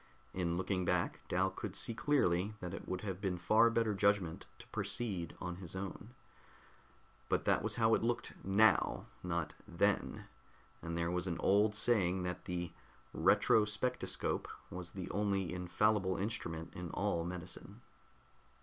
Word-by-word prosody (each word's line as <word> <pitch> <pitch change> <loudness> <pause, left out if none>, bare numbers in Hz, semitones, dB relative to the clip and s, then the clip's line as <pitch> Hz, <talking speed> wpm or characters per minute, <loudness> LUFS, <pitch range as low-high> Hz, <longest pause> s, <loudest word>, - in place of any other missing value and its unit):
In 85 -2 0
looking 95 0 0
back, 90 0 +1
Dal 95 +1 +1
could 100 -3 -6
see 115 - 0
clearly 105 -7 +2
that 90 0 -5
it - - -7
would 95 0 -2
have 95 -2 -4
been 95 -3 -1
far 110 +7 +5
better 115 -2 +1
judgment 100 -4 +1
to - - -12
proceed 95 -9 -2
on 90 -1 -4
his 90 -1 -8
own. 100 +5 -6 1.1
But - - +1
that - - +3
was - - -1
how 115 -1 +4
it - - +3
looked 120 +1 -1
now, 105 +3 +4 0.2
not 85 -3 -2
then, - - 0 0.6
and 85 0 -4
there 85 0 0
was 90 +1 -1
an 85 -2 -1
old 105 +2 +4
saying 95 -5 +2
that 90 0 -4
the 90 -2 -3 0.4
"retrospectoscope" 105 +3 +2 0.2
was 90 0 -5
the 95 -2 -5
only 100 -4 0
infallible 95 +2 +1
instrument 90 -6 -3
in 90 -1 -6
all 100 -4 0
medicine. 90 +1 -6
95 Hz, 150 wpm, -35 LUFS, 90-105 Hz, 1.1 s, far